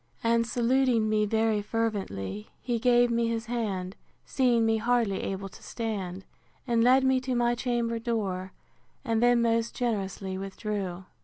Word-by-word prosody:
And 230 0 +2
saluting 240 -1 +2
me 215 -1 +2
very 220 -1 +1
fervently, 190 - -3
he 240 -2 -2
gave 245 0 +4
me 235 0 +1
his 230 0 -2
hand, 200 -6 -3 0.3
seeing 240 -4 +2
me 225 0 +2
hardly 230 -3 +1
able 195 0 -4
to - - -15
stand, 195 -5 -4 0.4
and 235 -3 +2
led 260 +2 +5
me 265 0 +3
to 255 0 -2
my 240 0 +2
chamber 240 -2 -1
door, 200 -6 -2 0.5
and 225 -2 +1
then 240 -1 +4
most 230 0 +1
generously 195 -5 -2
withdrew. 195 -2 -4
230 Hz, 150 wpm, -28 LUFS, 195-240 Hz, 0.5 s, led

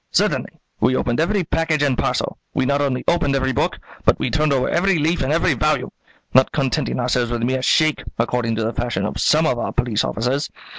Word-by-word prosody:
"Certainly; - - +1 0.3
we 125 +3 +2
opened 120 +1 0
every 190 +4 +1
package 160 -2 0
and 140 -3 +2
parcel; - - -2 0.2
we - - +1
not 140 +2 +1
only 135 -3 -1
opened 145 -5 +2
every 130 -1 0
book, 120 - -1 0.3
but - - +3
we - - -2
turned 155 -1 +1
over 135 -2 +1
every 195 +1 +2
leaf 160 +3 0
in 130 +1 0
each 165 -3 +2
volume, - - 0 0.4
not 130 +1 +5
contenting 140 -1 -1
ourselves 125 -1 0
with 120 -1 -2
a - - +3
mere 130 +1 0
shake, 155 +3 +2 0.2
according 115 0 0
to 110 - -1
the 115 +2 -2
fashion 120 0 -2
of - - -3
some 155 +1 +3
of 125 -6 0
our - - -2
police 115 -4 0
officers. 130 +6 -1
135 Hz, 215 wpm, -20 LUFS, 125-155 Hz, 0.4 s, not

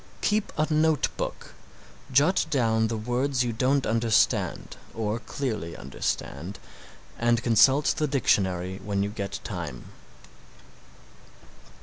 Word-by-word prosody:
Keep 210 0 +1
a 155 - +3
note 155 -1 +2
book, - - -5 0.6
jot 145 +8 +3
down 110 -4 +2
the 110 0 -3
words 125 +4 0
you 120 -1 -2
don't 130 +4 +1
understand 115 0 +1 0.2
or 110 0 -2
clearly 110 -10 -4
understand 70 +6 -4 0.6
and 120 0 +2
consult 130 +5 +5
the 155 - +1
dictionary 95 -8 +1
when 100 -1 -1
you 100 - -1
get 100 -2 -5
time. 60 - -6
115 Hz, 110 wpm, -26 LUFS, 100-135 Hz, 0.6 s, consult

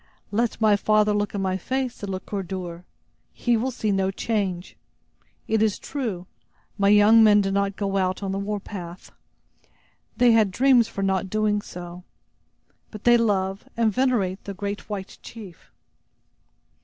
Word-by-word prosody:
"Let 230 +3 0
my 215 -2 +4
father 215 +1 +2
look 205 0 -1
in 195 - -2
my 185 0 0
face," 260 +5 -2
said 205 - -8
Le 190 -1 -3
Coeur 200 +1 -5
dur; 180 -2 -6 0.5
"he 240 -1 +1
will 235 +4 0
see 220 -4 -2
no 195 -1 +1
change. 195 -3 -3 0.7
It 220 -1 +1
is 215 -3 +2
true, 225 -11 -4 0.5
my 200 -1 +2
young 210 +2 +7
men 210 -1 +6
did 195 -1 -1
not 200 0 0
go 195 -1 -2
out 185 +1 -1
on 195 - -2
the 195 - -2
war 205 +1 -3
path; 180 -3 -9 1.1
they 245 -1 +5
had 220 -3 +4
dreams 245 +3 +4
for 195 - -5
not 190 0 0
doing 210 0 +1
so. 175 -1 -9 0.9
But 215 -2 -10
they 240 0 +6
love 195 -4 0
and 225 -2 +2
venerate 220 -7 0
the 200 - -6
great 200 +2 -5
white 195 -2 -6
chief." 205 -7 -12
205 Hz, 165 wpm, -24 LUFS, 190-220 Hz, 1.1 s, young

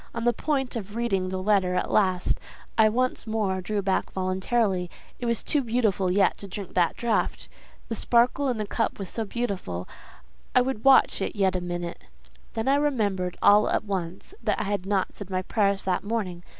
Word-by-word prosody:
On 230 - -2
the 240 0 +3
point 270 0 -1
of 210 -2 -5
reading 195 -6 0
the 190 - -3
letter 185 -2 +2
at 180 - -1
last, 185 -3 +2 0.4
I 220 -1 +5
once 250 +1 -1
more 205 -4 0
drew 205 +2 -2
back 190 0 0
voluntarily; 190 0 0 0.3
it 245 - -3
was 235 -1 +1
too 290 -3 +1
soon 210 -6 +1
yet 195 0 +2
to 200 - -7
drink 195 0 -7
that 175 -2 +2
draught—the 230 0 -3
sparkle 240 +5 +2
in 250 -3 0
the 215 - -2
cup 225 +2 -1
was 195 -3 -5
so 225 - -3
beautiful—I 200 - -4
would 250 -3 -2
watch 270 -1 +5
it - - -2
yet 190 -2 +2
a 180 - -1
minute. 175 -1 -5 0.5
Then 225 +2 -2
I 275 +1 +4
remembered 205 -11 0
all 205 +1 +6
at - - +1
once 190 - -4
that - - 0
I - - 0
had 200 -2 -2
not 195 -2 0
said 200 -2 -9
my 185 -1 -1
prayers 200 -1 +1
that 185 -1 0
morning. 200 -5 -3
205 Hz, 190 wpm, -26 LUFS, 185-235 Hz, 0.5 s, all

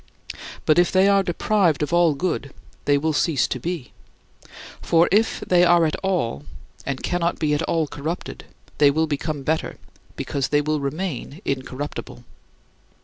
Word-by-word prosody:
But 155 +2 +4
if 175 - +3
they 190 +1 +4
are 200 0 +4
deprived 175 -3 +1
of 150 - -3
all 170 -3 +4
good, 145 -3 -2 0.3
they 145 0 +4
will 155 +2 0
cease 145 -1 +1
to 130 - -3
be. 165 -1 -5 0.9
For 165 +1 +3
if 215 +3 +2
they 180 -1 +3
are 175 -1 +5
at 155 - 0
all 175 - -1 0.4
and 135 -1 -3
cannot 175 -1 0
be 150 -2 0
at 150 - +1
all 165 -1 0
corrupted, 150 +4 -6 0.3
they 145 -1 +7
will 160 +3 +1
become 150 -1 -3
better, 160 +3 -1 0.4
because 140 -2 -2
they 145 - +2
will 155 +1 -1
remain 145 +1 -4
incorruptible. 135 +1 -5
155 Hz, 155 wpm, -23 LUFS, 145-175 Hz, 0.9 s, they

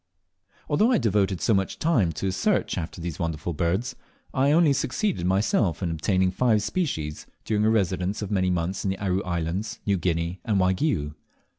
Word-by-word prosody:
Although 210 +11 +3
I 245 - +4
devoted 100 - +1
so 115 - +3
much 95 -1 0
time 120 - +2
to - - -4
a 95 - +1
search 195 - 0
after 85 -1 -5
these 85 -1 -5
wonderful 85 0 -2
birds, 85 - -1 0.4
I 135 +2 +3
only 160 -2 +5
succeeded 175 - -1
myself 95 -2 +1
in 85 - 0
obtaining 95 +3 +1
five 110 +1 +2
species 105 - -3 0.2
during 105 -1 +1
a - - +4
residence 95 -2 0
of 105 - -5
many 95 -2 +1
months 90 +1 -1
in 100 - 0
the 95 - -2
Aru 95 -1 0
Islands, 90 +5 -3
New 100 -1 +2
Guinea, 85 +1 -1
and 105 -4 +1
Waigiou. 95 - +1
95 Hz, 180 wpm, -25 LUFS, 85-110 Hz, 0.4 s, only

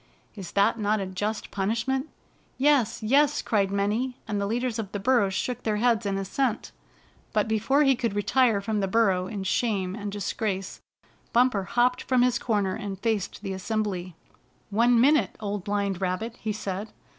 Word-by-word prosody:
Is 195 -4 -9
that 200 +3 +3
not 210 0 +1
a 195 - -2
just 205 +4 -3
punish 220 +5 -1
ment?" 265 +3 -1 0.5
"Yes! 260 -6 +2
Yes!" 285 +6 +3
cried 200 -3 +1
many, 210 +6 -1
and 205 -2 -1
the 200 - -1
leaders 240 +1 -1
of 205 -3 -4
the 205 - -3
burrows 205 -4 +2
shook 250 +3 -2
their 215 -1 0
heads 230 -1 +2
in 195 -1 -1
assent. 220 +5 -1 0.6
But 210 0 +2
before 225 +7 +2
he 270 -2 +4
could 235 -4 -2
retire 215 +1 +2
from 210 +1 -1
the 195 - 0
burrow 190 -3 +2
in 200 -1 -5
shame 190 -2 0
and 205 0 -5
disgrace. 200 -1 -3 0.5
Bumper 235 -5 +3
hopped 245 +5 +2
from 255 -2 +2
his 250 -1 +2
corner, 205 -5 0
and 195 0 -5
faced 210 -2 -2
the 195 -2 -3
assembly. 190 -3 -3 0.6
"One 235 +3 +4
minute. 260 -5 +3
Old 205 -2 -3
Blind 200 -2 -1
Rabbit," 190 +6 -2
he 220 - -2
said. 205 0 -5
215 Hz, 175 wpm, -26 LUFS, 195-240 Hz, 0.6 s, he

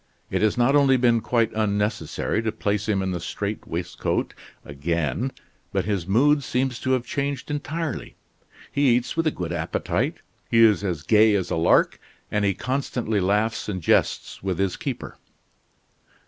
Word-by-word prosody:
It - - 0
has 110 +1 +2
not 125 +4 +3
only 135 -2 +5
been 120 -2 +3
quite 115 -1 +1
unnecessary 105 -2 -1
to 110 -1 -1
place 105 -1 -2
him 100 -2 +1
in 95 - -1
the 90 - -2
strait 100 +5 -4
waistcoat 85 +1 -2 0.3
again, 80 - -2 0.4
but 95 -3 0
his 100 -5 -1
mood 145 +9 +4
seems 130 0 -1
to 130 - 0
have 125 -2 0
changed 140 0 -3
entirely. 150 0 -4 0.6
He 140 -4 +3
eats 125 0 -1
with 165 0 +1
a - - +5
good 85 - -4
appetite; 80 -1 -1 0.3
he 115 0 +5
is 105 -4 +4
as 85 -6 -2
gay 110 +1 +5
as 95 -3 -1
a - - +1
lark, 80 +1 +3 0.3
and 105 -1 +1
he 100 -2 +2
constantly 125 -4 -1
laughs 105 +4 0
and 95 -3 -2
jests 80 - +1
with 95 -2 -2
his 95 -1 0
keeper." - - -6
110 Hz, 165 wpm, -24 LUFS, 95-125 Hz, 0.6 s, only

